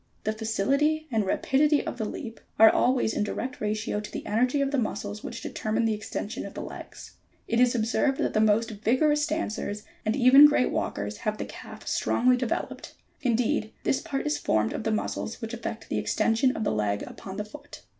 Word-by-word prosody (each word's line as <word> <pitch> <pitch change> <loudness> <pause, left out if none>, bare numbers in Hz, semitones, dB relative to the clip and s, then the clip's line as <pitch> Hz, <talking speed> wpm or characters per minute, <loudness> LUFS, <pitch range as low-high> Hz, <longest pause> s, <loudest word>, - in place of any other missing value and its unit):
The 215 - 0
facility 275 +9 +1
and 220 -4 +1
rapidity 290 +8 +2
of 245 - -5
the 220 - -1
leap 225 0 -7 0.2
are 220 0 +8
always 245 -3 +2
in - - 0
direct 255 +4 -4
ratio 215 0 -1
to 210 - -8
the - - -6
energy 250 +6 +1
of 275 -1 +1
the 285 - +1
muscles, 210 -2 -3
which - - -6
determine 220 +1 -1
the 225 - +2
extension 210 0 -5
of - - -9
the - - -4
legs. - - -10 0.3
It 230 - +1
is 250 0 +4
observed 245 +4 +1
that - - -1
the 215 - +3
most 220 +2 +3
vigorous 275 +8 +2
dancers 215 -9 -3 0.2
and 215 +1 0
even 270 +3 +8
great 295 -4 +2
walkers 105 +1 -3
have 215 0 -2
the - - -4
calf - - -11
strongly 250 +1 +2
developed: 250 -1 -3 0.3
indeed 230 -3 0
this 270 - +1
part 275 -1 -3
is 150 0 0
formed 110 -6 +1
of - - -5
the 220 - +1
muscles 215 +1 -3
which 225 +1 -6
effect 230 -1 -5
the - - -1
extension 235 +3 +1
of 220 - -2
the - - +1
leg 105 -1 0
upon 190 0 -8
the 210 - -3
foot. 290 +7 -12
225 Hz, 200 wpm, -27 LUFS, 215-260 Hz, 0.3 s, are